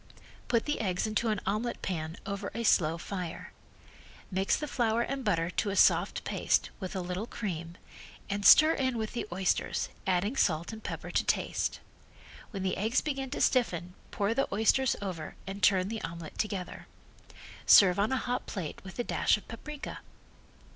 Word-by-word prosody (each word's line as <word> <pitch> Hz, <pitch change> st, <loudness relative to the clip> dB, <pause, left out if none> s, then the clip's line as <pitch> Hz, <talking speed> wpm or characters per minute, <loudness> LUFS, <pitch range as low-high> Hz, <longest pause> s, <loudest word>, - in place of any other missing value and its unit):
Put 235 Hz, -2 st, +1 dB
the 295 Hz, -, -1 dB
eggs 185 Hz, -3 st, 0 dB
into 215 Hz, +2 st, 0 dB
an 210 Hz, -1 st, 0 dB
omelet 215 Hz, +5 st, -2 dB
pan 160 Hz, -2 st, -3 dB
over 200 Hz, -1 st, -4 dB
a 235 Hz, -, -2 dB
slow 165 Hz, -6 st, +3 dB
fire. 180 Hz, -1 st, -6 dB, 0.8 s
Mix 190 Hz, +1 st, +1 dB
the 300 Hz, -, -4 dB
flour 235 Hz, -4 st, +1 dB
and 270 Hz, +2 st, -3 dB
butter 170 Hz, -5 st, +1 dB
to 205 Hz, -, -1 dB
a 200 Hz, -, -2 dB
soft -, -, +4 dB
paste -, -, +1 dB
with 190 Hz, 0 st, -5 dB
a 190 Hz, -, -1 dB
little 180 Hz, +5 st, -4 dB
cream, 170 Hz, -8 st, -5 dB, 0.5 s
and 200 Hz, 0 st, -2 dB
stir 310 Hz, -, +8 dB
in 260 Hz, -4 st, 0 dB
with 220 Hz, -1 st, -3 dB
the 240 Hz, -, -3 dB
oysters, 185 Hz, +1 st, 0 dB, 0.2 s
adding 190 Hz, +6 st, +1 dB
salt 170 Hz, -4 st, +1 dB
and 220 Hz, -, -9 dB
pepper -, -, -5 dB
to -, -, +2 dB
taste. -, -, -1 dB, 0.7 s
When 195 Hz, -4 st, -5 dB
the 185 Hz, -, 0 dB
eggs 220 Hz, +5 st, +2 dB
begin 270 Hz, -3 st, -3 dB
to 285 Hz, -, -3 dB
stiffen 180 Hz, -9 st, +1 dB, 0.2 s
pour 205 Hz, +1 st, 0 dB
the 270 Hz, +4 st, 0 dB
oysters 225 Hz, +5 st, +3 dB
over 175 Hz, -5 st, -5 dB
and 195 Hz, +2 st, -6 dB
turn 190 Hz, -2 st, +4 dB
the 225 Hz, 0 st, -4 dB
omelet 165 Hz, -2 st, -7 dB
together. 200 Hz, -4 st, -3 dB, 0.8 s
Serve 185 Hz, -2 st, +8 dB
on 205 Hz, +2 st, +2 dB
hot 250 Hz, -1 st, -2 dB
plate 180 Hz, -7 st, -5 dB
with 190 Hz, 0 st, -10 dB
a 240 Hz, -, 0 dB
dash -, -, +2 dB
of 210 Hz, -, -14 dB
paprika. 295 Hz, +6 st, -7 dB
200 Hz, 175 wpm, -30 LUFS, 180-235 Hz, 0.8 s, stir